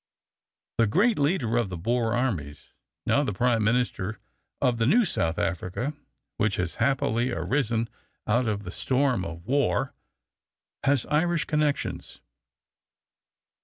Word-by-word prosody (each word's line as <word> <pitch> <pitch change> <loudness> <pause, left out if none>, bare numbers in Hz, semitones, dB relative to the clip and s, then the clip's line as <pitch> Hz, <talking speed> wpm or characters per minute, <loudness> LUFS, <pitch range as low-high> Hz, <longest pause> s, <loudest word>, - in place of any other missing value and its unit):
The 115 - +5
great 210 - +3
leader 140 -6 +1
of 120 -5 +1
the 90 - -5
Boer 115 +5 0
armies, 90 - -3 0.3
now 145 - +3
the 130 - -1
Prime 115 +2 +2
Minister 110 -3 0 0.4
of 120 -2 +1
the 115 - +2
new 235 - +5
South 85 - 0
Africa 95 - -2 0.4
which 105 -2 +1
has 90 -2 -2
happily 125 -2 +1
arisen 115 - 0 0.4
out 120 +3 +2
of 105 -1 -1
the 90 - -6
storm 130 -3 +1
of 85 0 -7
war, 140 +2 +1 0.9
has 140 -3 +2
Irish 165 +2 +1
connections. 150 -2 -1
120 Hz, 130 wpm, -26 LUFS, 100-140 Hz, 0.9 s, The